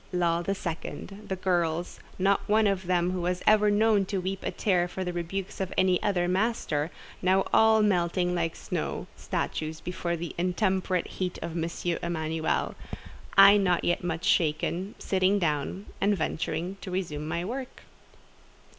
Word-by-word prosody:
Lull 170 Hz, -2 st, +1 dB
the 195 Hz, +3 st, -1 dB
second—the 195 Hz, +3 st, -5 dB
girls, 175 Hz, -2 st, -1 dB, 0.2 s
not 195 Hz, +1 st, +3 dB
one 215 Hz, +1 st, +4 dB
of 195 Hz, -2 st, +1 dB
whom 180 Hz, 0 st, +1 dB
was 180 Hz, +1 st, -1 dB
ever 210 Hz, -1 st, +5 dB
known 210 Hz, 0 st, +3 dB
to 195 Hz, +1 st, -2 dB
weep 190 Hz, +1 st, -2 dB
a -, -, -2 dB
tear 180 Hz, -4 st, +1 dB
for 185 Hz, +1 st, -4 dB
the 180 Hz, -1 st, -3 dB
rebukes 180 Hz, +3 st, -4 dB
of 190 Hz, -, -2 dB
any 185 Hz, -1 st, +3 dB
other 180 Hz, -4 st, +1 dB
master, 180 Hz, -6 st, 0 dB, 0.3 s
now 190 Hz, +1 st, +3 dB
all 220 Hz, -1 st, +6 dB
melting 180 Hz, -2 st, +1 dB
like 165 Hz, -2 st, -1 dB
snow -, -, -3 dB
statues 155 Hz, 0 st, -3 dB
before 175 Hz, -1 st, -3 dB
the 170 Hz, 0 st, -5 dB
intemperate 185 Hz, 0 st, 0 dB
heat 180 Hz, -1 st, -4 dB
of 170 Hz, 0 st, -5 dB
M. 165 Hz, 0 st, -1 dB, 0.3 s
Emanuel: 160 Hz, -1 st, -1 dB, 0.6 s
I 200 Hz, +1 st, +9 dB
not 180 Hz, -3 st, +2 dB
yet 175 Hz, -, 0 dB
much 170 Hz, +1 st, -2 dB
shaken, 175 Hz, +2 st, +1 dB
sitting 190 Hz, +1 st, +2 dB
down, 165 Hz, +2 st, -1 dB, 0.2 s
and 205 Hz, 0 st, +3 dB
venturing 175 Hz, +3 st, -2 dB
to -, -, -7 dB
resume 160 Hz, -5 st, -3 dB
my 170 Hz, +2 st, -2 dB
work. 255 Hz, +4 st, -6 dB
180 Hz, 155 wpm, -28 LUFS, 170-195 Hz, 0.6 s, I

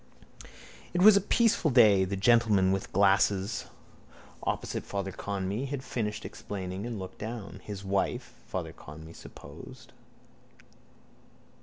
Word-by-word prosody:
It 180 Hz, -, +3 dB
was 215 Hz, 0 st, +9 dB
a 200 Hz, -, +4 dB
peaceful 225 Hz, -4 st, +2 dB
day. 105 Hz, -7 st, +6 dB
The 95 Hz, +2 st, -3 dB
gentleman 105 Hz, -2 st, +4 dB
with 95 Hz, 0 st, -1 dB
the -, -, -18 dB
glasses 100 Hz, +2 st, +2 dB, 0.8 s
opposite -, -, -3 dB
Father 100 Hz, -1 st, -4 dB
Conmee 100 Hz, +6 st, -3 dB
had 135 Hz, -1 st, -4 dB
finished 110 Hz, -4 st, -3 dB
explaining 95 Hz, +1 st, -6 dB
and 120 Hz, -2 st, -4 dB
looked 95 Hz, -1 st, -8 dB
down. 110 Hz, -2 st, -6 dB
His 100 Hz, -2 st, -7 dB
wife, 95 Hz, 0 st, -1 dB
Father -, -, -4 dB
Conmee 80 Hz, +2 st, -11 dB
supposed. 70 Hz, -, -12 dB
100 Hz, 125 wpm, -29 LUFS, 95-120 Hz, 0.8 s, was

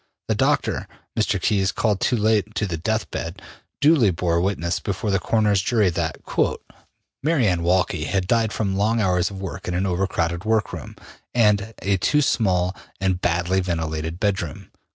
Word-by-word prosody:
The -, -, +2 dB
doctor, -, -, +1 dB, 0.3 s
Mr. -, -, +1 dB
Keys, 100 Hz, -2 st, +1 dB
called 105 Hz, -4 st, 0 dB
too 125 Hz, -, +1 dB
late 105 Hz, 0 st, +1 dB
to 105 Hz, -, 0 dB
the 90 Hz, -4 st, -3 dB
death 110 Hz, +5 st, -2 dB
bed, 85 Hz, +4 st, -5 dB, 0.4 s
duly 145 Hz, -7 st, +5 dB
bore 85 Hz, -1 st, 0 dB
witness 85 Hz, -2 st, -1 dB
before 100 Hz, +1 st, -2 dB
the 95 Hz, -, +2 dB
coroner's 105 Hz, +1 st, +2 dB
jury 105 Hz, -3 st, +2 dB
that 80 Hz, -1 st, -3 dB
``Mary 155 Hz, -3 st, -2 dB
Anne 90 Hz, -5 st, +2 dB
Walkley 85 Hz, -3 st, +1 dB
had 95 Hz, +1 st, 0 dB
died 115 Hz, +1 st, +2 dB
from 100 Hz, -4 st, -1 dB
long 110 Hz, +4 st, +1 dB
hours 90 Hz, -3 st, +2 dB
of 100 Hz, -2 st, -8 dB
work 95 Hz, 0 st, -6 dB
in 90 Hz, -, -1 dB
an 90 Hz, +2 st, 0 dB
over 95 Hz, +1 st, 0 dB
crowded 85 Hz, -1 st, -1 dB
workroom, 110 Hz, -1 st, -1 dB, 0.4 s
and 105 Hz, -2 st, +2 dB
a 100 Hz, 0 st, +2 dB
too 150 Hz, +10 st, +2 dB
small 95 Hz, -7 st, +1 dB, 0.2 s
and 95 Hz, -1 st, 0 dB
badly 90 Hz, +2 st, +1 dB
ventilated 80 Hz, -2 st, -2 dB
bedroom.'' 95 Hz, -7 st, -2 dB
95 Hz, 170 wpm, -23 LUFS, 90-110 Hz, 0.4 s, duly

